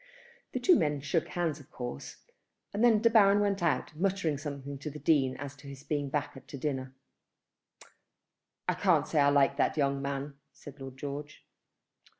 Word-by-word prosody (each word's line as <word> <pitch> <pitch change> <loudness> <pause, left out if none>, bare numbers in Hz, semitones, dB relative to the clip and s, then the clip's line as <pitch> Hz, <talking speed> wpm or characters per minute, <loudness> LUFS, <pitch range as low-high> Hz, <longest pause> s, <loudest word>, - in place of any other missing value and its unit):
The 255 - -1
two 345 +6 +5
men 150 -1 +1
shook 155 +3 0
hands 165 -4 -2
of 145 - -16
course, 120 - -6 0.6
and 210 +3 0
then 225 -2 +5
De 230 - +6
Baron 205 -2 +6
went 200 -2 +1
out, 150 -3 0
muttering 185 -2 0
something 140 -2 -6
to 150 - -5
the 150 - -8
Dean 140 -3 +2
as 145 0 -7
to 140 - -13
his 140 0 -9
being 145 -1 -2
back 140 -1 -4
to 140 - -7
dinner. 130 -2 -3 1.7
"I - - +3
can't - - +2
say 155 - +1
I 140 0 +5
like 140 -1 +3
that 150 - +1
young 140 -1 +1
man," 140 0 -4 0.2
said 145 -1 -12
Lord 135 -1 -8
George. 145 +1 -7
145 Hz, 175 wpm, -30 LUFS, 140-165 Hz, 1.7 s, De